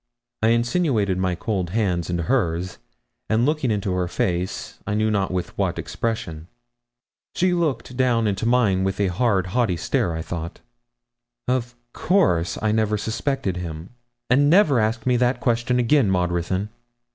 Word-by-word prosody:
I 110 - +3
insinuated 115 - +1
my 90 -1 0
cold 95 -2 -2
hand 90 -4 -1
into 85 -1 -1
hers, 90 -4 -1 0.5
and 110 +2 +2
looked 155 +1 0
into 105 -6 0
her 90 -1 0
face 90 +1 -3
I 105 - -1
know 110 +1 +1
not 100 -2 0
with 90 -1 -3
what - - 0
expression. 90 -9 -4 0.9
She 180 0 +2
looked 145 -8 -1
down 120 -3 +2
into 100 +2 -1
mine 110 -6 +3
with 95 +1 -2
a 100 -2 +2
hard, 95 0 +1
haughty 115 -8 +1
stare, 85 +1 0
I 80 - -4
thought. 85 0 -6 0.9
'Of 120 -1 -1 0.2
course 90 - +1
I 110 - +2
never 110 -1 +1
suspected 110 -2 -2
him; 85 0 -6 0.4
and 140 +3 +4
never 155 - +5
ask 110 +1 -1
me 125 -1 +3
that 125 +1 +1
question 120 0 +1
again, 125 -1 +3
Maud 90 -2 +1
Ruthyn.' 95 +4 -2
110 Hz, 155 wpm, -23 LUFS, 90-125 Hz, 0.9 s, never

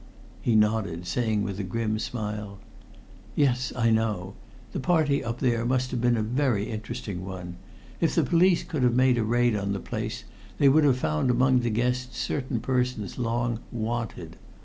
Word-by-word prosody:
He 115 - +2
nodded, 105 -6 +1
saying 110 0 0
with 100 0 -4
a - - -1
grim 110 +3 -1
smile, 105 -3 -4 0.8
"Yes; 125 -4 +2
I 115 -1 +2
know. 105 -4 0 0.4
The - - -3
party 155 -3 +2
up 115 -1 -3
there 120 -3 +1
must 125 +1 0
have 125 - -2
been 120 -1 +3
a 110 - 0
very 120 -3 0
interesting 110 -4 -5
one. 90 -2 -7 0.4
If - - +1
the - - +4
police 175 +1 +3
could 155 -6 -3
have 125 -1 +3
made 130 -1 +4
a - - +1
raid 120 +1 +2
on 100 -1 -1
the 100 - -2
place - - -4 0.3
they 140 - +5
would 150 +2 +5
have 135 -3 +4
found 75 0 0
among 125 +1 +4
the 120 -1 0
guests 125 +2 -1
certain 130 -4 -2
persons 125 -5 -1
long 120 -1 -1
'wanted.' 115 0 -4
120 Hz, 175 wpm, -26 LUFS, 105-125 Hz, 0.8 s, they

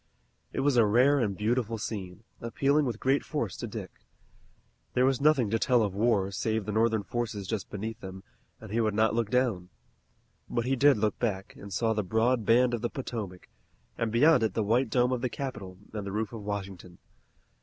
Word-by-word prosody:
It - - -2
was 140 -2 +2
a 115 - +6
rare 130 +7 +4
and 100 -6 -1
beautiful 115 +1 0
scene, 105 -2 -6 0.2
appealing 140 +5 +1
with 115 -3 -3
great 135 +2 +2
force 120 - -3
to - - -5
Dick. - - -7 1.0
There 125 - +4
was 135 0 +1
nothing 140 -8 +3
to 115 - +1
tell 125 -1 +3
of 100 -3 -1
war 100 -2 +1
save 110 +1 -1
the 105 - -3
Northern 110 0 +2
forces 110 -2 -4
just 110 -2 -3
beneath 110 +2 -5
them, 95 0 -9 0.4
and 110 -2 -11
he 115 +2 +1
would 110 -2 0
not 110 +1 +3
look 115 -2 0
down. 115 -8 0 0.8
But 120 - -1
he 135 +1 +1
did 140 -1 +5
look 105 0 0
back, 100 -5 -2
and 100 - -11
saw 110 +4 +1
the 105 - 0
broad 110 +4 +1
band 125 +2 +4
of 120 - -2
the 120 - -1
Potomac, 105 -9 -6 0.5
and 115 -1 -2
beyond 135 +4 +5
it 110 -4 0
the 110 - +1
white 120 +6 +2
dome 125 0 +2
of 125 -2 -1
the 125 - -1
Capitol 110 -9 -6 0.2
and 105 -2 -4
the - - -4
roof 110 +2 -3
of 115 - -6
Washington. 95 -3 -6
110 Hz, 205 wpm, -28 LUFS, 100-125 Hz, 1.0 s, a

